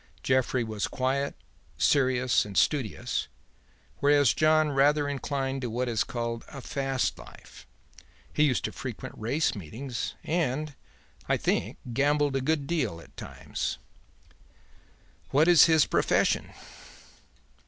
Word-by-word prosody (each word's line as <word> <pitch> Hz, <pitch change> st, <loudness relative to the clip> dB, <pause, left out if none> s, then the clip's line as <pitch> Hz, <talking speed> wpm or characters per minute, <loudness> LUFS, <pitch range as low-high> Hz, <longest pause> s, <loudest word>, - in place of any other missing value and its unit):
Jeffrey 130 Hz, -1 st, +1 dB
was 110 Hz, -2 st, -3 dB
quiet, 135 Hz, +2 st, -1 dB, 0.4 s
serious 130 Hz, -3 st, +3 dB
and 100 Hz, -2 st, -7 dB
studious, 135 Hz, -9 st, 0 dB, 0.7 s
whereas 145 Hz, -1 st, +4 dB
John 155 Hz, -1 st, +3 dB
rather 145 Hz, +2 st, +3 dB
inclined 135 Hz, -1 st, -2 dB
to 125 Hz, -, -3 dB
what 125 Hz, +3 st, -2 dB
is 115 Hz, -4 st, +1 dB
called 115 Hz, -1 st, -4 dB
a 140 Hz, -, -9 dB
fast 135 Hz, 0 st, -2 dB
life; -, -, -14 dB, 0.7 s
he -, -, 0 dB
used 130 Hz, -5 st, +1 dB
to -, -, -3 dB
frequent 125 Hz, -5 st, -7 dB
race 130 Hz, +9 st, 0 dB
meetings, 115 Hz, -, -5 dB
and, 155 Hz, -2 st, -1 dB, 0.6 s
I -, -, +3 dB
think, -, -, -1 dB, 0.2 s
gambled 145 Hz, +1 st, +2 dB
a 135 Hz, -, +1 dB
good 150 Hz, +1 st, 0 dB
deal 135 Hz, -, -1 dB
at -, -, -16 dB
times." -, -, -5 dB, 1.5 s
"What 150 Hz, +4 st, +3 dB
is 175 Hz, -5 st, +8 dB
his 160 Hz, -3 st, +5 dB
profession?" -, -, +1 dB
135 Hz, 120 wpm, -28 LUFS, 125-145 Hz, 1.5 s, is